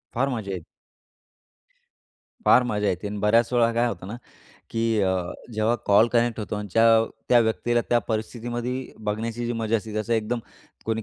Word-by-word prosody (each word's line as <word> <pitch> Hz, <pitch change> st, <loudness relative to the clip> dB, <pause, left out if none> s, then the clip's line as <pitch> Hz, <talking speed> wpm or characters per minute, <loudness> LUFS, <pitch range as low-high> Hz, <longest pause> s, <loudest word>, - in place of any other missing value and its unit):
फार 135 Hz, +4 st, +1 dB
मजा 110 Hz, -6 st, -4 dB
ये 95 Hz, -, -3 dB, 1.9 s
फार 125 Hz, -, +6 dB
मजा 105 Hz, -4 st, -1 dB
येते 90 Hz, +2 st, -1 dB
आणि 105 Hz, 0 st, -5 dB
बऱ्याच 115 Hz, +4 st, +3 dB
वेळा 115 Hz, -1 st, +4 dB
काय 120 Hz, +1 st, +2 dB
होतं 90 Hz, -5 st, -5 dB
ना? 105 Hz, -, -5 dB, 0.6 s
की 115 Hz, -1 st, +1 dB
अ, 95 Hz, -1 st, +2 dB, 0.4 s
जेव्हा 110 Hz, +2 st, +1 dB
कॉल 105 Hz, +3 st, +5 dB
कनेक्ट 120 Hz, -1 st, +2 dB
होतो 105 Hz, -, -4 dB
आणि 105 Hz, 0 st, -5 dB
च्या 115 Hz, +3 st, +5 dB, 0.2 s
त्या 120 Hz, -, +6 dB
व्यक्तीला, 120 Hz, +1 st, +1 dB
त्या 120 Hz, -, +4 dB
परिस्थितीमध्ये 120 Hz, +3 st, -4 dB
बघण्याची 115 Hz, +3 st, -2 dB
जी 120 Hz, -, -1 dB
मजा 115 Hz, -1 st, 0 dB
असते, 110 Hz, 0 st, -6 dB
जसं 110 Hz, +2 st, -2 dB
एकदम 115 Hz, +2 st, 0 dB, 0.5 s
कोणी 110 Hz, 0 st, -1 dB
115 Hz, 170 wpm, -25 LUFS, 105-120 Hz, 1.9 s, फार